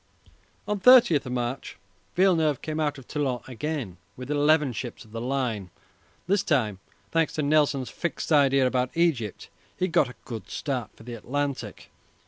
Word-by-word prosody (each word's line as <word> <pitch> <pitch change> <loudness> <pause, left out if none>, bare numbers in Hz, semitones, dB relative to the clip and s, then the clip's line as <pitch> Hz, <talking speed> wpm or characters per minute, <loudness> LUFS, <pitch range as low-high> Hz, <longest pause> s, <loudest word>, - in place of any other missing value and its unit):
On 210 -1 -1
30 235 - +7
March 125 +1 -3 0.4
Villeneuve 165 -6 +3
came 155 0 -3
out 150 -2 0
of 135 - -13
Toulon 135 -5 -1
again 130 - -4 0.2
with 130 +3 -6
eleven 150 -2 +3
ships 120 0 -6
of 110 - -19
the 115 +1 -5
line. 120 -7 -2 0.6
This 195 +2 +2
time, 110 - 0 0.3
thanks 165 -1 +1
to 155 - -1
Nelson's 145 -3 +2
fixed 170 -1 -4
idea 140 -3 +5
about 125 0 +1
Egypt, 135 - 0 0.3
he 185 - +1
got 170 -7 +2
a 125 - -11
good 115 -3 -7
start 130 -6 -3
for - - -15
the 120 +1 -7
Atlantic. 140 +4 -4
140 Hz, 155 wpm, -26 LUFS, 125-155 Hz, 0.6 s, 30